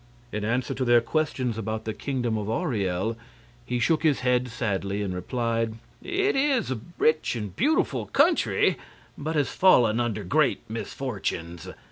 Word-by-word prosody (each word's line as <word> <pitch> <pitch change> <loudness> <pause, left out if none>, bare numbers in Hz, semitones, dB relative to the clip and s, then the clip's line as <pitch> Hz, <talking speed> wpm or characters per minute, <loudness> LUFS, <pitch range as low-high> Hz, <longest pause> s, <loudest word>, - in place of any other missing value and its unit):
In 105 0 -3
answer 125 +5 0
to 130 0 -2
their 120 -1 +5
questions 125 -3 -1
about 110 0 -3
the 110 - -2
Kingdom 125 -4 -2
of 105 -1 -3
Auriel, 110 - -1 0.5
he 125 - -1
shook 155 +7 +2
his 150 -6 +2
head 125 0 +2
sadly 105 -4 -2
and 95 -2 -3
replied: 115 +3 -1 0.3
"It 395 +3 0
is 270 - +2
a 125 - -2 0.2
rich 155 -4 +2
and 105 -5 -5
beautiful 305 +6 +1
country, - - +3 0.4
but 155 +2 -4
has 145 -2 +2
fallen 120 - +4
under 110 -3 -1
great 140 - +1
misfortunes. 95 - -4
120 Hz, 150 wpm, -26 LUFS, 110-140 Hz, 0.5 s, their